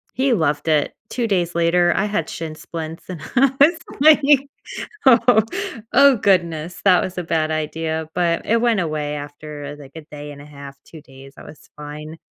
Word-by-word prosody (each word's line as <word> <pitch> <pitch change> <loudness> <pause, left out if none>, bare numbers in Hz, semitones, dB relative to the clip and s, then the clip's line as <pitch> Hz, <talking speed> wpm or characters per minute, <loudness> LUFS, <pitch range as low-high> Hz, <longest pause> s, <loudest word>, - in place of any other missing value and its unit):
He 260 0 +2
loved 160 -6 0
it, 155 -2 +1
2 240 -2 -2
days 175 -5 -1
later, 175 +1 +3
I 195 - +1
had 205 -6 -2
shin 160 -1 -6
splints, 160 +1 -8
and 175 -4 -7
I 265 +1 +4
was 325 +4 +5 0.2
like, 305 0 +7 0.9
"Oh 235 -3 +6 0.5
oh 280 0 +6
goodness, 170 -5 0
that 185 -3 +5
was 185 0 -5
a - - -1
bad 160 -1 0
idea," 160 0 -3
but 170 -1 0
it 230 +1 +2
went 235 -4 +2
away 150 -3 -3
after, 145 0 -8
like, 140 -2 -13
a 160 - -8
day 150 -1 -10
and 140 - -13
a - - -14
half, 140 -1 -11
2 160 - -13
days, 135 0 -15
I - - -10
was 150 - -15
fine. 150 +2 -9
165 Hz, 185 wpm, -20 LUFS, 150-195 Hz, 0.9 s, like